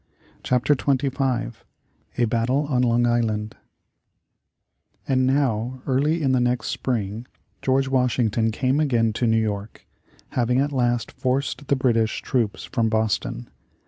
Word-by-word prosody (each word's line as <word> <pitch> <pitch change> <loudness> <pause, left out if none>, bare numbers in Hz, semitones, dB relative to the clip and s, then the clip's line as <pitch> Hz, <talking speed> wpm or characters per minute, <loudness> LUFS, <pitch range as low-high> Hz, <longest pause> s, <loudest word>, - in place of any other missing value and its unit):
CHAPTER 125 +3 +2
XXV 135 - 0 0.6
A 120 - +3
BATTLE 120 +5 0
on 125 -3 +2
LONG 120 -1 +2
ISLAND 110 -3 0 1.5
And 130 -1 +2
now, 130 -2 0
early 150 +5 +1
in 135 - +2
the 130 - +3
next 125 -1 0
spring, 115 -1 -3 0.3
George 135 +1 +1
Washington 120 -4 +1
came 130 +5 0
again 120 -7 +2
to 120 +2 0
New 115 0 +3
York, 105 -1 -4 0.4
having 125 0 0
at 145 +2 +1
last 120 -4 0
forced 135 +2 -2
the 140 - +3
British 115 -4 +1
troops 115 -6 -1
from 115 -5 0
Boston. 110 - -1
125 Hz, 130 wpm, -23 LUFS, 115-135 Hz, 1.5 s, A